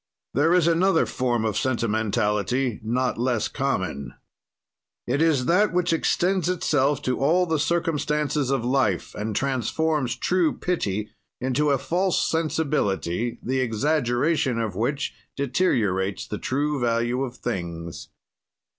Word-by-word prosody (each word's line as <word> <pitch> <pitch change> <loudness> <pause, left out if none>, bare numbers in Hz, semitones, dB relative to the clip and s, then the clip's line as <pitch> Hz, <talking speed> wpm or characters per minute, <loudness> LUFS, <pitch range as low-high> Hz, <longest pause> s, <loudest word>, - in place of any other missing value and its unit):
"There 145 +5 +3
is 175 -2 +4
another 170 +1 +3
form 120 -3 -1
or 110 - 0
sentimentality 110 +1 0
not 125 +3 -1
less 120 -2 +1
common. 90 - -2 0.9
"It 135 +5 0
is 155 -6 +3
that 185 +6 +3
which 180 -1 +1
extends 180 +2 +1
itself 145 -5 +1
to 130 -2 -1
all 170 +7 +3
the 160 -3 0
circumstances 150 -3 0
of 135 -4 0
life 125 -9 +1
and 105 0 -4
transforms 135 +1 0
true 175 +4 +1
pity 105 - -2 0.3
into 130 +4 +1
a 140 - +3
false 175 +8 0
sensibility, 120 - -1
the 130 +2 0
exaggeration 130 +2 +1
of 110 -5 -2
which 140 +7 -1 0.2
deteriorates 105 - 0
the 105 - -5
true 145 +2 -1
value 120 +1 +1
of 125 -2 -6
things. 85 -7 -5
130 Hz, 125 wpm, -24 LUFS, 115-155 Hz, 0.9 s, is